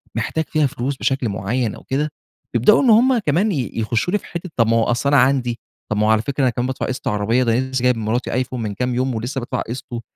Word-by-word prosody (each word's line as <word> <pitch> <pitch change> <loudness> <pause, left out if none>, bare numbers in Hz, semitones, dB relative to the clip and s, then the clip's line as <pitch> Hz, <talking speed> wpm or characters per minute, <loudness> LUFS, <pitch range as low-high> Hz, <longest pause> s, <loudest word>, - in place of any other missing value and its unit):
محتاج 120 +8 -1
فيها 155 -2 +2
فلوس 130 +2 -3
بشكل 135 -4 0
معين 105 +4 -2
أو - - -13
كده، 145 +3 -1 0.5
يبدأوا 125 - +5
إن 255 - +4
هم 245 +4 +5
كمان 200 +1 +1
ي 135 -9 -2
يخشوا 115 - -1
لي - - +4
في - - -17
حتة 170 +1 -6
طب 115 -2 +4
ما 115 +1 +3
هو 115 - +3
أصل 120 +4 0
أنا 145 - +4
عندي، 125 -2 +1 0.3
طب 105 - 0
ما 105 - +2
هو - - +2
على 110 -1 +3
فكرة 140 +4 -3
أنا 130 - +4
كمان 120 +2 -2
بادفع 130 - -3
قسط 130 +1 -4
عربية، 115 +2 +1
ده 115 - 0
أنا - - +2
لسه 130 0 -3
كمان - - -5
جايب - - -8
لمراتي 115 +3 -2
آيفون 130 0 -2
من 105 -2 -3
كام 125 +4 -2
يوم، 130 0 0
ولسه 125 +5 -3
بادفع 120 - -3
قِسطُه، 120 0 -6
125 Hz, 265 wpm, -20 LUFS, 115-140 Hz, 0.5 s, يبدأوا